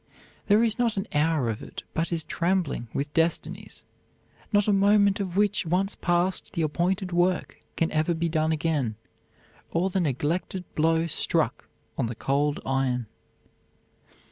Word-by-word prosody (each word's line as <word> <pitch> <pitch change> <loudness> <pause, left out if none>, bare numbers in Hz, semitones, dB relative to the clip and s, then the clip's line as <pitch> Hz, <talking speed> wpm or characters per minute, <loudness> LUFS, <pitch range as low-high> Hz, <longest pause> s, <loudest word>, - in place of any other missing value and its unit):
There 210 +2 +5
is 225 0 +1
not 230 -4 +1
an 195 - -1
hour 150 -3 +2
of 110 -2 -3
it - - -8
but 165 +2 -1
is 165 -2 0
trembling 170 -9 -1
with 145 +1 -3
destinies 165 +1 -1 0.7
not 205 -1 +3
a 210 - +4
moment 200 0 +4
of 190 -2 -3
which, 205 0 +2
once 185 +4 +1
passed, 175 +2 0
the 170 -4 0
appointed 180 +5 0
work 175 +1 0 0.2
can 165 - 0
ever 155 +2 +1
be 170 +1 0
done 160 -1 +1
again, 150 -8 0 0.7
or 180 +3 0
the 190 - +1
neglected 165 +4 -1
blow 165 +1 +2
struck 165 - 0 0.3
on - - +1
the 115 - -5
cold 145 +4 0
iron." 130 -2 0
170 Hz, 150 wpm, -26 LUFS, 150-190 Hz, 0.7 s, There